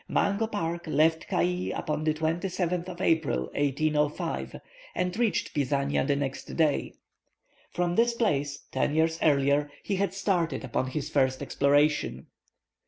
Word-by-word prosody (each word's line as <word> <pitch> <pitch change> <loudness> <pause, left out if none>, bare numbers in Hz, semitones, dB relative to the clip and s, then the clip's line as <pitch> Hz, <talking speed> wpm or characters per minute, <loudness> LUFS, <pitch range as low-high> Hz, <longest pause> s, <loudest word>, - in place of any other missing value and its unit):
Mungo 200 +3 +1
Park 170 -5 -3
left 160 +2 +2
Cayee 180 +1 0
upon 155 0 -2
the 155 - +3
27th 175 +2 -1
of 180 0 -7
April, 160 - +2
1805, 150 +1 -1 0.4
and 180 0 -1
reached 225 -5 0
Pisania 140 -1 +1
the 145 - +2
next 140 -1 -3
day. 155 -3 +1 0.7
From 175 -1 -1
this 235 +2 +3
place, 145 - 0
ten 145 - 0
years 160 +1 +2
earlier, 145 0 +3
he 200 - -1
had 195 -1 -1
started 175 -7 0
upon 130 - -1
his 140 +2 -3
first 130 -2 +1
exploration. 145 +2 +2
160 Hz, 135 wpm, -28 LUFS, 145-180 Hz, 0.7 s, the